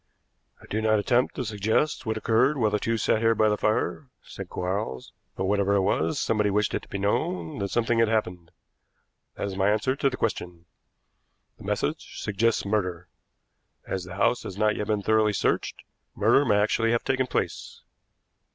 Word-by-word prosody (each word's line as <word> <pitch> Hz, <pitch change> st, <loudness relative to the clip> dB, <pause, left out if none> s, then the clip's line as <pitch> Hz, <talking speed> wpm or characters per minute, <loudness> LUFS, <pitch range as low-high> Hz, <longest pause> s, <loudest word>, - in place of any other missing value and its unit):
"I -, -, -15 dB
do 110 Hz, -, -2 dB
not 110 Hz, 0 st, +3 dB
attempt 120 Hz, +4 st, +1 dB
to 130 Hz, -, -3 dB
suggest 110 Hz, +7 st, 0 dB
what 110 Hz, 0 st, -1 dB
occurred 125 Hz, +7 st, +2 dB
while 110 Hz, -4 st, +2 dB
the 105 Hz, -, +1 dB
two 115 Hz, +2 st, -1 dB
sat 110 Hz, -, +1 dB
here 115 Hz, 0 st, +3 dB
by 110 Hz, 0 st, +3 dB
the 105 Hz, -, +2 dB
fire," 110 Hz, +7 st, -1 dB, 0.2 s
said -, -, -9 dB
Quarles, 90 Hz, -9 st, -4 dB, 0.2 s
"but 95 Hz, -, -2 dB
whatever 100 Hz, 0 st, +2 dB
it 100 Hz, -, +3 dB
was, 85 Hz, -4 st, 0 dB
somebody 105 Hz, -2 st, +1 dB
wished 105 Hz, +1 st, +1 dB
it -, -, -1 dB
to -, -, -16 dB
be -, -, -5 dB
known 90 Hz, -4 st, -1 dB
that 100 Hz, 0 st, -2 dB
something 115 Hz, +1 st, +1 dB
had 115 Hz, -, +4 dB
happened. 90 Hz, -6 st, -2 dB, 0.9 s
That -, -, -3 dB
is 100 Hz, -1 st, -4 dB
my 95 Hz, +1 st, +2 dB
answer 110 Hz, +5 st, +1 dB
to 140 Hz, -, +1 dB
the 130 Hz, -, -6 dB
question. 90 Hz, -6 st, -3 dB, 0.9 s
The -, -, -11 dB
message -, -, -3 dB
suggests 105 Hz, +2 st, 0 dB
murder. 90 Hz, -4 st, -2 dB, 0.8 s
As 95 Hz, -1 st, -3 dB
the 90 Hz, +1 st, -9 dB
house 120 Hz, +4 st, +2 dB
has 95 Hz, -, -8 dB
not 105 Hz, 0 st, +2 dB
yet 105 Hz, -, -3 dB
been 105 Hz, -2 st, 0 dB
thoroughly 110 Hz, 0 st, +3 dB
searched, -, -, -1 dB, 0.3 s
murder 115 Hz, +7 st, +4 dB
may 105 Hz, -, +3 dB
actually 115 Hz, +2 st, +2 dB
have 115 Hz, -, 0 dB
taken 130 Hz, -1 st, 0 dB
place." -, -, -3 dB
105 Hz, 190 wpm, -26 LUFS, 100-115 Hz, 0.9 s, had